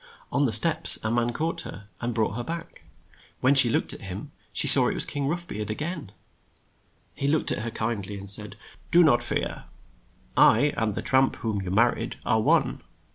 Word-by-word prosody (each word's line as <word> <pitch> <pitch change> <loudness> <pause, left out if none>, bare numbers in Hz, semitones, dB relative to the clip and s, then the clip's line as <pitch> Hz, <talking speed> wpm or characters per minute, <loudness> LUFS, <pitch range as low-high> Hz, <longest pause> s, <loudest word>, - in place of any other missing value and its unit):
On 140 0 -1
the 120 - -2
steps 160 +8 +6
a 110 - -3
man 120 0 -2
caught 165 +5 -5
her, 100 0 -12
and 120 0 -4
brought 110 -3 -2
her 120 +3 -6
back. 165 +5 -10 0.5
When 130 +2 +1
she 135 -4 +6
looked - - -2
at - - -13
him, - - -9 0.2
she - - +1
saw - - +10
it - - -4
was - - -2
King 140 -1 -5
Rough 175 +3 -5
Beard 105 0 -7
a 110 - -4
gain. 155 - -7 1.0
He 140 - -5
looked 150 +2 -1
at - - -4
her 115 - -6
kind 110 -3 -6
ly 105 - -8
and 100 0 -11
said, 105 +1 +2 0.3
"Do 175 +1 +4
not 120 -7 +2
fear. 120 - -4 0.7
I 145 +7 +2
and 110 -3 -3
the - - -6
tramp 130 0 +1
whom 110 -3 -5
you 95 - -8
mar 115 +6 +1
ried 115 - -8
are 110 -2 0
one. - - -1
120 Hz, 210 wpm, -23 LUFS, 110-145 Hz, 1.0 s, saw